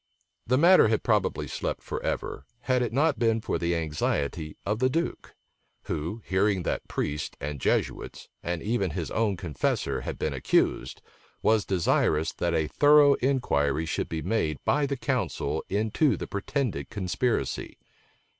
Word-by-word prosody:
The 130 +2 +3
matter 175 -1 +7
had 110 0 0
probably - - +1
slept - - -4
forever, - - -4
had 125 0 +1
it 120 -3 -1
not 145 +4 +2
been 115 -1 +2
for 95 - -2
the 85 0 0
anxiety 75 -1 -2
of 105 +2 -1
the 130 +1 +3
duke; 165 +6 -3 0.5
who, 85 +9 -4
hearing 95 0 +1
that - - -2
priests 75 0 -3
and 75 -1 -5
Jesuits, - - -1
and 85 -1 -3
even 105 -3 0
his 80 0 -4
own 105 -4 +1
confessor, 80 -8 -1
had - - -5
been - - -2
accused, - - 0 0.4
was 110 -2 +3
desirous 80 -4 +1
that 85 -1 -1
a 80 -1 +2
thorough 145 - +6
inquiry 80 - +1
should 80 - -2
be 80 -1 -3
made 80 -10 0
by 145 0 +2
the 140 0 -2
council - - -1
into 110 +8 +1
the - - -4
pretended 100 - -2
conspiracy. 115 +3 -2
100 Hz, 150 wpm, -27 LUFS, 80-125 Hz, 0.5 s, matter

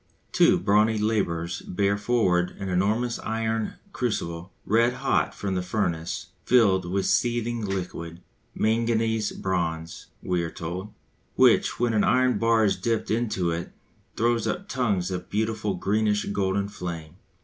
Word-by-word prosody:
Two - - +5
brawny 105 +3 +3
labourers 90 -6 -1
bear 100 +2 0
forward 100 -5 +1
an 100 -1 -4
enormous 110 +6 0
iron 110 0 -2 0.2
crucible, 95 -7 -3
red 115 +3 +3
hot 130 +2 0
from 100 -2 -3
the 90 - 0
furnace, 90 -4 -2
filled 100 -7 +4
with 95 0 0
seething 120 -1 0
liquid 90 -4 -4 0.4
manganese 110 -1 +1
bronze, 85 -3 -3 0.2
we 90 -2 0
are 85 - -3
told 90 +6 -6 0.4
which, - - +4
when 120 -1 +1
an 105 - +3
iron 125 +5 +3
bar 115 -1 +3
is 100 - +2
dipped 115 +4 -1
into 105 -6 0
it, 85 +1 -4 0.4
throws 115 0 +1
up 200 +2 -3
tongues 100 -8 0
of 90 -1 -5
beautiful 110 -1 -1
greenish 105 +2 +1
golden 100 0 0
flame. 85 -4 -7
105 Hz, 140 wpm, -26 LUFS, 90-115 Hz, 0.4 s, Two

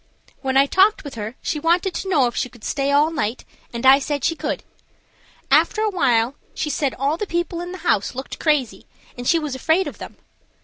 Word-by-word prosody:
When 265 -1 0
I 275 - +6
talked 385 +8 +3
with 285 -3 -8
her 220 +1 -6
she 300 - -2
wanted 345 +4 +1
to 385 - -4
know 295 -8 +4
if 240 - -2
she 255 - -1
could 235 -2 -18
stay 280 -1 -1
all 295 +3 +4
night, 255 -7 -3 0.3
and 235 +1 -5
I 270 +1 +8
said 285 -1 -3
she 330 - +1
could. - - -3 0.9
After 430 - +4
awhile 255 - +2 0.2
she 300 - -2
said 280 -3 -1
all 280 +4 0
the 420 - -3
people 345 0 -2
in 350 0 -6
the 370 - -6
house 205 +4 +1
looked 265 +1 -6
crazy, 295 -7 0 0.3
and 245 -1 -6
she 335 - +4
was 300 -4 -3
afraid 320 +8 +1
of - - -7
them. - - -9
285 Hz, 215 wpm, -21 LUFS, 260-340 Hz, 0.9 s, I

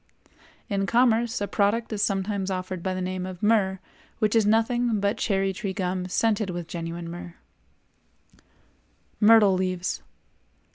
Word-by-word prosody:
In 195 -1 -1
commerce 235 -1 +2
a 205 - -1
product 220 +3 0
is 205 - -2
sometimes 195 -1 -1
offered 185 -1 -4
by 185 +1 -2
the 185 - -3
name 185 0 -3
of 185 0 -9
myrrh 205 -3 +3 0.4
which 215 +1 +1
is 220 -2 +4
nothing 225 +1 +2
but 200 +3 0
cherry 195 -2 0
tree 190 +1 -4
gum 185 -1 -2
scented 215 +1 +1
with 175 -2 -5
genuine 170 0 -5
myrrh. 175 +1 -8 1.8
MYRTLE 215 -2 +6
LEAVES. 185 -1 -2
195 Hz, 140 wpm, -25 LUFS, 185-220 Hz, 1.8 s, MYRTLE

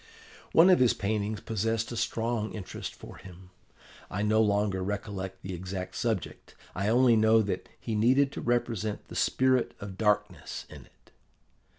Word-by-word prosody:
"One 175 +4 +7
of 185 - +5
his 125 -2 +4
paintings 105 +1 -2
possessed 115 +1 -1
a - - -4
strong 115 -1 -1
interest 100 -4 -6
for - - -12
him. 90 0 -13 0.6
I 100 +2 -2
no 110 +1 +3
longer 100 -2 +1
recollect 95 -1 -5
the 95 - -5
exact 95 +1 -5
subject: 110 -6 -3 0.2
I 100 +2 -2
only 120 +1 +5
know 110 0 +5
that 100 - -4
he 115 - -4
needed 130 +6 +3
to - - -6
represent 115 -3 -1
the - - -9
Spirit 130 -1 +2
of 100 -1 -8
Darkness 105 -6 -1
in - - -11
it. - - -29
105 Hz, 160 wpm, -29 LUFS, 100-115 Hz, 0.6 s, One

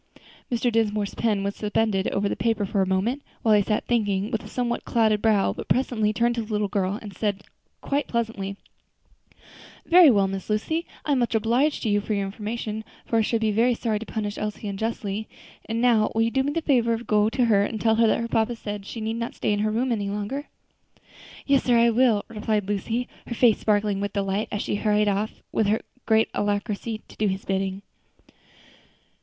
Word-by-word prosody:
Mr. 240 0 +1
Dinsmore's 210 -2 0
pen 210 -4 0
was 200 0 -2
suspended 210 -2 0
over 200 +1 0
the - - -1
paper 225 -3 0
for 195 0 0
a 190 - +1
moment, 205 +9 0 0.2
while 220 - +4
he 210 - +5
sat 210 +2 -1
thinking 205 -3 0
with 225 - -2
a - - -9
somewhat 240 -1 -2
clouded 220 -3 +2
brow; 215 -3 +3
but - - -8
presently 235 -5 +1
turning 235 +2 +1
to 235 - -2
the 220 0 -8
little 210 -1 +1
girl, 195 0 -1
he 205 - -7
said 205 0 -2 0.4
quite 285 +1 -1
pleasantly, 220 -4 -3 1.3
"Very 345 -2 +8
well, 200 -5 +4
Miss 195 +1 -5
Lucy, 315 +11 -1 0.2
I 295 - 0
am 275 - +3
much 240 -1 0
obliged 240 +7 +1
to 225 - 0
you 205 0 +2
for 210 +1 -2
your 200 -1 -1
information, 215 +2 -4 0.2
for 230 - +1
I - - +4
should 225 +1 0
be 220 -1 +2
very 235 +4 +3
sorry 220 -3 -1
to 225 - -7
punish 210 -2 -3
Elsie 210 0 -4
unjustly. 210 0 -3 0.4
And 225 +1 -2
now 230 -3 +4
will 225 - +3
you 230 - 0
do 265 - +2
me 280 +2 -1
the 330 +2 -2
favor 235 -6 +2
to 230 - -9
go 210 -2 +2
to 245 +2 +1
her 205 -3 +4
and 220 +1 -3
tell 220 +1 +2
her 230 0 +5
that - - +2
her 230 - -2
papa 230 +1 +1
says 205 -2 -5
she 230 - -6
need 220 +1 -2
not 235 0 -4
stay - - 0
in 205 - -1
her 215 +1 +1
room 240 +4 0
any 205 -3 -1
longer?" 210 +8 -4 1.0
"Yes, 275 -1 +3
sir, 245 -2 +4
I 235 0 +5
will," 230 -3 +3
replied 215 -2 -2
Lucy, 225 +4 -2 0.2
her 235 - -4
face 230 -2 +4
sparkling 205 -2 +1
with 205 0 -3
delight 195 +1 -1
as 205 - -2
she - - -1
hurried 210 0 +2
off 205 +2 -2
with 220 - +1 0.4
great 220 0 +4
alacrity 205 +2 -2
to - - -15
do 215 - +1
his 190 0 -3
bidding. 195 0 -2
215 Hz, 215 wpm, -25 LUFS, 205-235 Hz, 1.3 s, Very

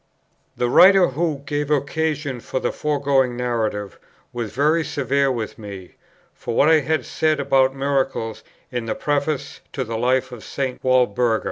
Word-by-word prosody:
The 120 - +1
writer, 190 +8 +6
who 150 0 -2
gave 145 0 -2
occasion 150 -1 -1
for 130 - -3
the - - -1
foregoing 140 -4 0
Narrative, 110 -5 -2 0.3
was 120 -3 -4
very 155 +4 +2
severe 140 -2 0
with 115 -4 -4
me 100 -4 -9 0.4
for 115 - -5
what 150 - +4
I 160 -1 +6
had 155 +2 -1
said 155 -1 0
about 135 -1 +2
Miracles 135 -5 -1 0.3
in 120 -2 -3
the 110 - -1
Preface 145 -1 -2
to 135 - -2
the 115 -2 -4
Life 130 +1 +1
of 120 -3 -9
St. 135 -2 -4
Walburga. 125 -3 +2
135 Hz, 155 wpm, -21 LUFS, 120-145 Hz, 0.4 s, writer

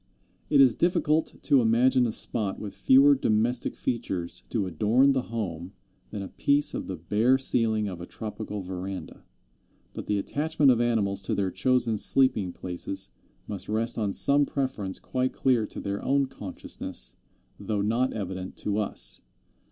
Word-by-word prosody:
It 145 - +4
is 130 -4 +6
difficult 160 -2 +1
to 140 -4 +4
imagine 125 +2 +3
a - - -2
spot 105 -2 +3
with 100 -2 -7
fewer 140 +2 +5
domestic 120 -1 0
features 95 -8 -3
to 105 -4 -1
adorn 110 - +3
the 135 -1 +1
home 95 -5 -5 0.4
than 105 -2 -5
a - - -6
piece 145 +7 +1
of - - -5
the 95 - -4
bare 105 +10 +2
ceiling 115 -5 +1
of 90 -3 -7
a 85 - -8
tropical 105 -2 -6
veranda; 95 +1 -7 0.7
but - - -7
the 105 - 0
attachment 145 +6 +1
of 120 -1 +2
animals 105 -5 0
to - - -2
their 95 -2 -1
chosen 120 -3 +1
sleeping 110 -9 +3
places 95 +2 -5 0.4
must 100 -1 -6
rest 115 +2 -1
on 105 -2 0
some 140 +7 +4
preference 130 -9 -3
quite 130 0 -2
clear 125 -5 +1
to - - -7
their 100 0 -4
own 140 +1 +2
consciousness, 95 - -4 0.4
though 105 -2 -2
not 120 +5 +1
evident 95 -2 -6
to 105 0 -2
us. 105 - -3
110 Hz, 160 wpm, -26 LUFS, 100-130 Hz, 0.7 s, is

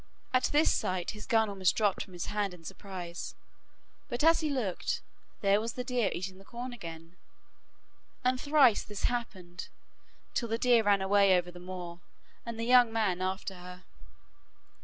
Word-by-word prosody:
At 255 - +4
this 300 +2 +4
sight 185 -1 -1
his 210 -1 -10
gun 225 -3 +3
almost 195 -2 +1
dropped 205 -3 +2
from 185 - -15
his 175 - -4
hand 205 -3 -2
in 170 - -17
surprise, 175 0 -7 0.7
but 240 +1 -2
as 330 +1 +6
he 310 - -1
looked, 245 -10 -2 0.4
there 200 0 +4
was 230 +1 -3
the 250 - -4
deer 245 -5 +1
eating 185 +1 -5
the - - -14
corn 245 +4 -6
again. 165 -4 -9 1.1
And 255 0 +1
thrice 285 -7 +5
this 210 -2 -7
happened, 190 -7 -3 0.7
till 235 - -1
the 225 - 0
deer 240 -1 +5
ran 200 -2 +3
away 195 -1 +5
over 175 0 -2
the 175 - -11
moor, 175 -1 -7 0.5
and 230 -1 -5
the 230 - -1
young 245 -1 +6
man 205 -5 0
after 190 +1 -2
her. 180 0 -11
200 Hz, 170 wpm, -31 LUFS, 180-240 Hz, 1.1 s, as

